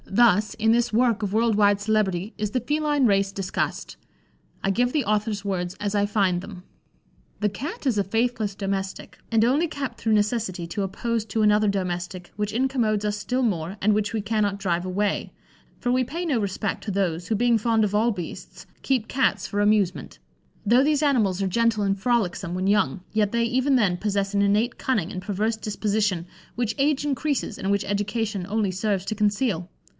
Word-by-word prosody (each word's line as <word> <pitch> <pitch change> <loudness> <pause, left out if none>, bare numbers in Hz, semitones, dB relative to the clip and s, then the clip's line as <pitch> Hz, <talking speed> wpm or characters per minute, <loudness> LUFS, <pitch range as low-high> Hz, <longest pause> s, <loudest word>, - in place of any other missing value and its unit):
Thus, 215 -1 +3
in 225 0 +2
this 240 +1 +1
work 230 -1 +2
of 200 - -1
world 225 +1 +2
wide 205 -1 +4
celebrity, 205 -2 0
is 210 -1 -2
the 255 - +1
feline 295 +2 +1
race 195 -2 +2
discussed. 195 -1 -3 0.7
I 195 - +1
give 245 +5 +1
the 300 -1 0
author's 210 -1 -1
words 180 -2 -2
as 205 0 -2
I 205 0 +3
find 195 -4 +1
them: 185 -2 -10 0.8
"The 210 - +2
Cat 285 - -6
is 245 -6 +2
a - - +2
faithless 225 0 -1
domestic, 195 -1 -4
and 225 0 +4
only 285 +8 +2
kept 275 -6 -5
through 225 -1 +1
necessity 210 -4 0
to 200 - -3
oppose 220 +4 -2
to 220 +1 -1
another 210 0 +4
domestic 180 -2 -3
which 210 0 -2
incommodes 230 -4 0
us 210 0 -1
still 250 +5 -1
more, 185 -3 -1
and 210 +2 +3
which 210 0 0
we 225 -1 -1
cannot 210 -1 0
drive 180 -3 -1
away; 200 +2 -1 0.5
for 245 - 0
we 255 +1 +3
pay 330 +8 -4
no 280 -8 +1
respect 200 0 -2
to 210 - -2
those, 180 -3 -1
who, 220 - +1
being 235 +1 +3
fond 225 0 +2
of 210 -1 0
all 225 +3 +3
beasts, 180 -6 -8 0.2
keep 255 -5 0
Cats 265 0 +1
for 205 -1 -1
amusement. 205 -3 +1 0.5
Though 240 +5 +5
these 300 0 +2
animals 215 -10 +2
are - - +1
gentle 225 +2 +1
and 195 0 +1
frolicksome 195 -5 0
when 185 +1 -1
young, 195 -6 +2
yet 210 -2 +2
they, 235 0 +1
even 260 +4 +2
then, 195 -8 +2
possess 200 0 -1
an 200 - +2
innate 210 +4 +2
cunning 215 -10 0
and 185 - -5
perverse 210 +3 -1
disposition, 210 -4 -1 0.3
which 230 -2 -1
age 290 0 +2
increases, 285 -5 -1
and 195 - -1
which 200 0 +1
education 205 -1 -2
only 210 -2 0
serves 190 0 -1
to 215 - -2
conceal. 205 -3 0
210 Hz, 190 wpm, -24 LUFS, 195-235 Hz, 0.8 s, Though